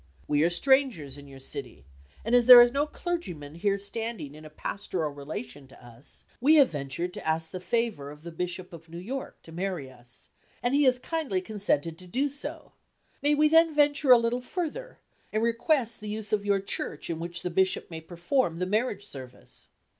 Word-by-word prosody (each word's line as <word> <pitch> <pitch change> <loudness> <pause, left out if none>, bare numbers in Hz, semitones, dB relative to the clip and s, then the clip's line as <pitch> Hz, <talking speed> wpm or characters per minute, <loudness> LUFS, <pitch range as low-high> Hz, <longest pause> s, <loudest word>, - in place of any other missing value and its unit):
We 145 0 +2
are 170 - +4
strangers 245 - +2
in 145 -1 -12
your 135 -1 -12
city, 65 - -5 0.4
and 230 - -1
as 245 -1 +5
there 250 -1 +13
is 240 0 +7
no 285 +3 0
clergymen 180 - -5
here 200 +4 0
standing 210 -6 -5
in 155 +1 -12
a - - -9
pastoral 160 0 -3
relation 145 - -7
to 130 -2 -17
us, 120 +2 -16
we 290 +6 +5
have 285 -4 +6
ventured 145 +4 -4
to - - -7
ask 160 0 -1
the 185 - -5
favor 185 -6 -1
of 150 +1 -12
the 170 - -7
bishop 180 +2 -4
of 165 0 -12
New 170 - -8
York 255 +10 -6
to 165 - -13
marry 175 -6 -4
us, 120 -1 -14 0.3
and 245 +2 +1
he 285 0 +4
has 255 -1 +4
kindly 275 - -2
consented 180 -6 -1
to 180 - -11
do 265 +10 0
so; 280 +1 -6 0.5
may 295 +1 +3
we 305 +1 +4
then 325 0 +4
venture 290 -1 +3
a 250 - +10
little 235 +1 0
further, 365 - -5 0.3
and 215 +1 0
request 235 +1 +1
the 210 - -6
use 215 0 -4
of 205 -1 0
your 200 -1 +3
church 190 -5 -4
in 165 -1 -3
which 170 +1 -5
the 180 - -2
bishop 190 0 +1
may 160 0 -6
perform 175 - -1
the 180 - -1
marriage 210 0 -1
service? 130 -7 -13
195 Hz, 200 wpm, -28 LUFS, 160-250 Hz, 0.5 s, there